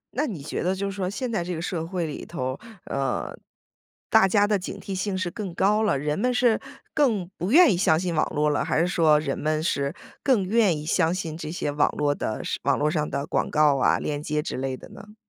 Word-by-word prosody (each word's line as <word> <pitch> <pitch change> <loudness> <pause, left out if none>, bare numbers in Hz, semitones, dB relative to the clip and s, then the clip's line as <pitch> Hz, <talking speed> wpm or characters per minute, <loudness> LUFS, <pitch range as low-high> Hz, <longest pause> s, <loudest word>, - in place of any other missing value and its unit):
那 290 +5 +1
你 175 - -5
觉 145 - -4
得 185 +2 +1
就 200 +1 -3
是 - - -4
说， 185 -2 -2
现 245 +4 -3
在 175 -6 -1
这 180 - -4
个 160 - -4
社 170 -2 -3
会 175 -1 -2
里 150 - -6
头， 130 -5 -4 0.3
呃， 135 -2 -2 0.8
大 195 - +6
家 205 +1 +3
的 210 -1 +2
警 195 +2 -6
惕 195 - -6
性 190 0 -2
是 185 -2 -1
更 195 -5 -5
高 210 +3 +3
了， 205 -10 +2
人 150 +2 -1
们 250 +3 +2
是 245 -2 +3 0.3
更 230 - +2
不 180 +5 -2
愿 330 0 +7
意 - - +1
相 160 -4 +3
信 180 -1 -2
网 155 - +2
络 150 0 +2
了， 145 - +1
还 - - 0
是 170 - +2
说 160 -4 +4
人 140 -3 -2
们 155 +1 0
是 140 -2 -1 0.3
更 235 -9 +2
愿 210 -3 +3
意 150 - -7
相 165 0 +2
信 165 -4 -4
这 155 -2 -6
些 155 -4 -2
网 145 0 +2
络 145 -1 +2
的 110 -6 -4
是 - - -3
网 - - +2
络 150 +1 +1
上 150 -3 -1
的 140 +1 -2
广 - - -1
告 150 -2 +4
啊、 130 - +3
链 145 -1 -3
接 150 0 -1
之 - - -4
类 130 0 -3
的 - - -13
呢？ 210 +1 -13
170 Hz, 265 characters per minute, -25 LUFS, 150-200 Hz, 0.8 s, 愿